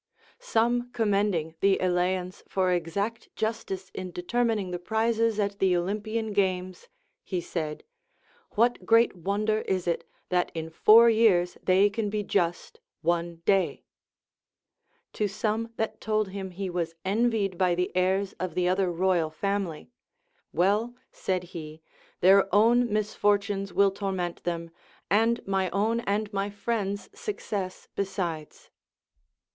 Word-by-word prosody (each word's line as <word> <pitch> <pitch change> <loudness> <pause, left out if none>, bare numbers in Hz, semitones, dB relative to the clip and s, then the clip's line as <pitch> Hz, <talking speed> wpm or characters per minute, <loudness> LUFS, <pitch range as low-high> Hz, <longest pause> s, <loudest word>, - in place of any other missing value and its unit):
Some 240 - +1
commending 200 -7 +1
the 195 -1 +4
Eleans 180 0 0
for 185 -1 +1
exact 200 +6 -2
justice 195 -4 -3
in 185 -1 -5
determining 210 +2 -1
the 175 - -3
prizes 225 +2 +1
at 200 -1 -1
the 185 -2 +3
Olympian 215 +4 -2
games, 185 - -1 0.4
he 185 - -2
said. 160 -3 -4 0.7
What 235 +3 +2
great 230 -1 +4
wonder 205 +4 0
is 185 -2 -1
it, 170 - 0 0.3
that 180 -1 +1
in 160 0 -4
four 225 +7 +7
years 195 -6 +3
they 190 +2 +4
can 210 0 -2
be 210 0 -2
just 175 -4 -1 0.2
one 170 0 -1
day 195 -2 +2 0.7
] - - -47
To 210 - 0
some 220 +3 -2
that 220 - -3
told 215 -2 0
him 190 0 -5
he 190 +2 -5
was 170 -2 -3
envied 210 -1 +1
by 180 -2 +3
the 180 +1 -2
heirs 190 +2 +1
of 185 -3 -3
the 180 -1 +1
other 185 0 +1
royal 175 -2 +1
family, 195 +2 -3 0.6
Well, 210 +7 +1 0.2
said 185 -1 -2
he, 155 -1 -8 0.4
their 195 +2 +6
own 235 +3 +4
misfortunes 205 -1 0
will 200 +1 +4
torment 190 -3 -3
them, 170 -1 -3 0.4
and 225 +3 +2
my 190 -1 0
own 215 +5 +1
and 210 -1 -2
my 200 +1 -1
friends' 205 -1 -3
success 310 - -5
besides. 175 -6 -4
195 Hz, 135 wpm, -27 LUFS, 180-215 Hz, 0.7 s, four